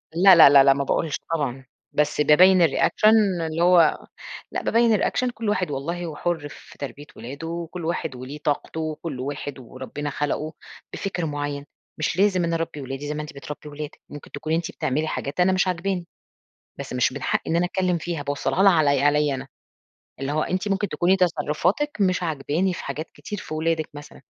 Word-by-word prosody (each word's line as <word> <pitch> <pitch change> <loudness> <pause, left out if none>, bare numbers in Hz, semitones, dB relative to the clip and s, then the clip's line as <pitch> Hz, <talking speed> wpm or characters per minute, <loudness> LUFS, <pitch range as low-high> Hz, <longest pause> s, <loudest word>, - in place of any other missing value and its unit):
لا، 185 +2 +8
لا، 160 -4 +9
لا، 140 -1 +8
لا 135 - +6
ما 140 +1 -1
باقولش 150 +2 -1 0.2
طبعًا، 135 -4 -3 0.3
بس 150 0 +1
بابيّن 180 +5 +6
الريأكشن 200 +4 +3
اللي 160 0 -2
هو 175 -3 +4 0.5
لأ - - -2
بابيّن 230 0 +3
الريأكشن، 250 +4 +1
كل 230 -3 -4
واحد 185 -6 0
والله 170 +6 -3
هو 160 -3 -6
حُر 160 -2 -2
في - - -14
تربية 145 +1 -7
ولاده 140 +7 -7
وكل 170 0 -5
واحد 165 -5 -2
وليه 130 +4 -7
طاقته 150 +2 -2
وكل 155 -3 -4
واحد 140 +1 -5
وربنا 130 +4 -6
خلقوا 150 +2 -2 0.4
بفِكْر 180 -4 -3
معيّن. 145 -1 -4 0.3
مش 155 +2 -1
لازم 190 -2 +3
أنا 170 0 0
أربّي 165 -3 -3
ولادي 135 +2 -6
زي 150 - -2
ما 150 - -3
أنتِ 150 +1 -8
بتربّي 150 +1 -8
ولادِك، 150 0 -8
ممكن 145 - -11
تكوني 155 +2 -2
أنتِ 170 +3 -2
بتعملي 155 -1 -1
حاجات 140 +1 -4
أنا 180 +1 +4
مش 185 0 +2
عاجباني. 180 0 -2 0.7
بس - - -6
مش 125 0 +1
من 140 0 -7
حقيّ - - 0
إن 165 - +2
أنا 175 +1 +2
أتكلّم 180 -1 0
فيها، 165 -1 -4
باوصّلها 145 +6 -1
لها 195 -1 +7
علي 145 -4 +3
عليّا 145 -1 +3
أنا. 130 - -6 0.7
اللي 135 +1 -2
هو 155 +1 0
أنتِ 185 +2 -2
ممكن 195 0 0
تكوني 175 +5 +2
تصرُّفاتِك 180 - 0
مش 185 -1 +2
عاجباني 160 +3 -1
في - - -7
حاجات 150 +4 -5
كتير 210 - -7
في - - -8
ولادِك 160 0 -1
مثلًا، 145 -1 -11
160 Hz, 190 wpm, -24 LUFS, 145-180 Hz, 0.7 s, لا